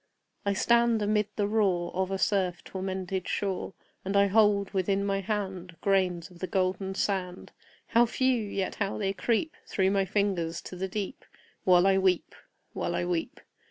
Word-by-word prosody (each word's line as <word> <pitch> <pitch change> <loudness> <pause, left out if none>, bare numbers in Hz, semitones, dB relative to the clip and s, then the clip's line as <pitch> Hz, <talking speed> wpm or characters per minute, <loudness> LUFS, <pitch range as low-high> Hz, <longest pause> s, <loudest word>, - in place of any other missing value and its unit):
I 200 - +3
stand 235 +2 +3
amid 210 0 +2
the 205 - +1
roar 190 -6 +1
Of 190 0 0
a 195 - -1
surf 190 -3 0
tormented 190 -1 -4
shore, 195 -1 -2 0.3
And 195 +1 0
I 200 - +6
hold 200 -1 +3
within 195 +1 0
my 195 -1 0
hand 190 -4 -3
Grains 185 -3 +1
of 175 - -15
the 185 - -3
golden 190 0 -1
sand 185 -3 -2 0.4
How 235 +1 +5
few! 260 0 +1
yet 200 -2 -2
how 200 -2 -2
they 195 -2 -1
creep 235 - 0
Through 190 -1 +1
my 195 -1 +2
fingers 190 -4 0
to - - -8
the 190 +2 -3
deep 195 +1 -5 0.4
While 180 -1 +6
I 195 0 +4
weep 185 -2 +1 0.4
while - - -2
I - - 0
weep! 175 -2 -2
195 Hz, 170 wpm, -28 LUFS, 185-205 Hz, 0.4 s, I